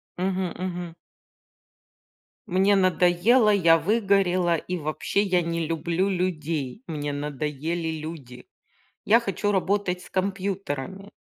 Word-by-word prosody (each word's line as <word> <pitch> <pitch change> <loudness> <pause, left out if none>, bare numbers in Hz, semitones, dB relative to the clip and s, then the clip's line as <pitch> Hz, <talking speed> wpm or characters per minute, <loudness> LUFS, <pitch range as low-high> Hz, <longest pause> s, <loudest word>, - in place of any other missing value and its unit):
Мгм, 185 0 -1
мгм. 175 -2 -5 1.5
Мне 195 +2 +3
надоело, 185 +5 +4
я 165 -4 +5
выгорела 190 -3 +2
и 180 +3 -4
вообще 155 +6 -1
я 185 -3 +2
не 165 -1 -2
люблю 170 +3 0
людей. 165 - -2
Мне 145 -2 -3
надоели 150 +3 -3
люди. 140 -6 -9 0.6
Я 230 +3 +5
хочу 205 -2 -1
работать 195 -1 0
с - - -15
компьютерами. 190 -2 -3
180 Hz, 105 wpm, -25 LUFS, 160-195 Hz, 1.5 s, я